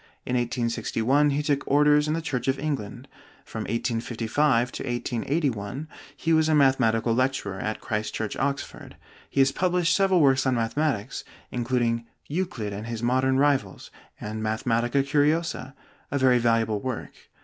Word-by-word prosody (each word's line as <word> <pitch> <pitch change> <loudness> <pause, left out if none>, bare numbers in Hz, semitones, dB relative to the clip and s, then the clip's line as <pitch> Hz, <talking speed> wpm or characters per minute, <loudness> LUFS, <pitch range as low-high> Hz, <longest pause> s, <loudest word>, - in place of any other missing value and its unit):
In 125 - -3
1861 120 +3 +1
he 145 +1 0
took 145 -1 +1
orders 150 +1 +4
in 155 - 0
the 165 - -3
Church 125 -5 -3
of 135 0 +2
England. 140 -8 -4 0.4
From - - -5
1855 115 +3 0
to - - -6
1881 125 0 -2 0.3
he 165 - +1
was 160 0 +3
mathematical 130 -6 +3
lecturer 120 -6 -1
at 110 0 -3
Christ 105 -1 -2
Church, 110 -2 -3
Oxford. 140 +1 -3 0.3
He 135 - +2
has 135 0 +4
published 175 +1 +1
several 190 -2 +3
works 135 -3 +4
on 130 - +2
mathematics, 120 0 -1 0.3
including 120 -1 0 0.2
'Euclid 145 - -3
and 105 +3 -6
His 115 -1 -5
Modern 130 +2 +2
Rivals,' 135 -9 0 0.3
and 110 +1 -5
'Mathematica 115 +4 0
Curiosa,' 145 -1 0 0.3
a 140 - -1
very 130 -2 +4
valuable 115 -3 +1
work. 130 -2 -4
130 Hz, 145 wpm, -26 LUFS, 115-145 Hz, 0.4 s, orders